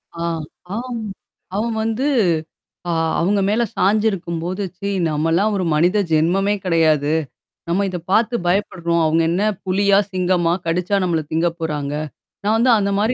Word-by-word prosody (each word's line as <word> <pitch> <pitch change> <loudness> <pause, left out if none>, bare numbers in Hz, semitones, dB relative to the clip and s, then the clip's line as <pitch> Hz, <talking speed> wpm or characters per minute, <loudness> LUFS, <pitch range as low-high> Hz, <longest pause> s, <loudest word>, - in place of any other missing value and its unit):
ஆ, 170 - -4 0.5
ஆம் 240 0 -4 0.5
அவன் 225 +2 -1
வந்து 225 +6 -1 0.8
ஆ - - 0 0.3
அவுங்க 200 +4 +2
மேல 220 +3 +2
சாஞ்சிருக்கும்போது, 185 -2 0
ச்சீ 200 +2 -3 0.2
நம்மல்லாம் 165 +7 +1
ஒரு 185 - -1
மனித 175 +7 +3
ஜென்மமே 185 +6 +2
கிடையாது. 155 -4 +2 0.6
நம்ம 195 +4 +1
இத 180 - -4
பாத்து 230 +3 +3
பயப்படுறோம். 170 -3 0
அவுங்க 160 +1 +2
என்னா 195 +5 +1 0.2
புலியா? 195 +1 +3
சிங்கமா? 180 -2 +1
கடிச்சா 180 +4 +1
நம்மள 170 -3 +1
திங்க 165 +2 +2
போறாங்க? 150 -3 -3 0.5
நான் 210 +2 +2
வந்து 245 +2 +4
அந்த 200 -1 0
மாரி 220 +4 +2
185 Hz, 135 wpm, -20 LUFS, 165-205 Hz, 0.8 s, வந்து